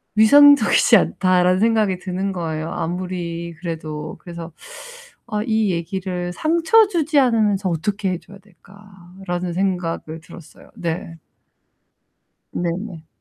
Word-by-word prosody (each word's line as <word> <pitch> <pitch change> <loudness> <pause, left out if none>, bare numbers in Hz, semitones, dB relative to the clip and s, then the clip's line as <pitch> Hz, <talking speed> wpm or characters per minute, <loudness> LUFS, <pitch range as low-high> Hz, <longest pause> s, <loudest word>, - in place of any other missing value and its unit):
위생적이지 285 +6 +6
않다.'라는 185 0 +2
생각이 215 -5 +2
드는 190 +2 -3
거예요 160 -2 -4
아무리 170 -1 -4
그래도. 155 -3 -6
그래서 170 -1 -9 0.8
'아 210 -3 -2
이 220 -3 +1
얘기를 180 +1 -4
상처주지 330 - +2
않으면서 215 -7 +2
어떻게 190 +4 -2
해줘야 190 +2 -8
될까.'라는 190 -2 -8
생각을 175 -4 -2
들었어요, 170 -1 -15
네. 165 -1 -5 1.4
네네. 175 -1 -4
185 Hz, 270 characters per minute, -20 LUFS, 170-210 Hz, 1.4 s, 위생적이지